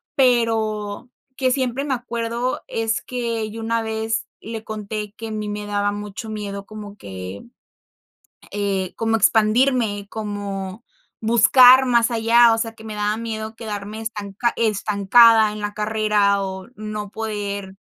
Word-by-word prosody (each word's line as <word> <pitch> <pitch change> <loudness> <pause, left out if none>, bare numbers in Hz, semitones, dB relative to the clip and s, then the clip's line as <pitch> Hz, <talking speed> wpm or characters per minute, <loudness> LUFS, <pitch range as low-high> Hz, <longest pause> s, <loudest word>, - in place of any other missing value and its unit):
pero 225 -4 +1 0.3
que, 260 -1 +1
siempre 260 0 -1
me 285 -2 -1
acuerdo, 235 0 -3
es 225 -1 -1
que 230 -3 -3
yo 225 +1 -7
una 230 +1 0
vez 220 +1 -2 0.2
le 225 0 -6
conté 210 -1 -5
que 225 +1 -7
a - - -6
mí 215 -1 -4
me 205 0 -4
daba 205 0 0
mucho 205 +2 -6
miedo 200 -2 -5
como 210 -1 -10
que, 95 - -8 1.1
eh, 195 -3 -2
como 225 0 0
expandirme, 220 -1 +2
como 205 -1 -5 0.4
buscar 250 +3 +7
más 235 -1 +3
allá, 230 +1 +5
o - - 0
sea, 225 0 -3
que 220 - -15
me 220 -1 -7
daba 210 +1 0
miedo 220 -1 -5
quedarme 215 -1 -6
estanca 215 +1 -2
estancada 215 +1 +4
en 210 - -7
la 205 0 -4
carrera 210 -2 +1
o 190 -1 -6
no 215 -1 -5
poder 205 -3 -4
215 Hz, 145 wpm, -21 LUFS, 205-230 Hz, 1.1 s, buscar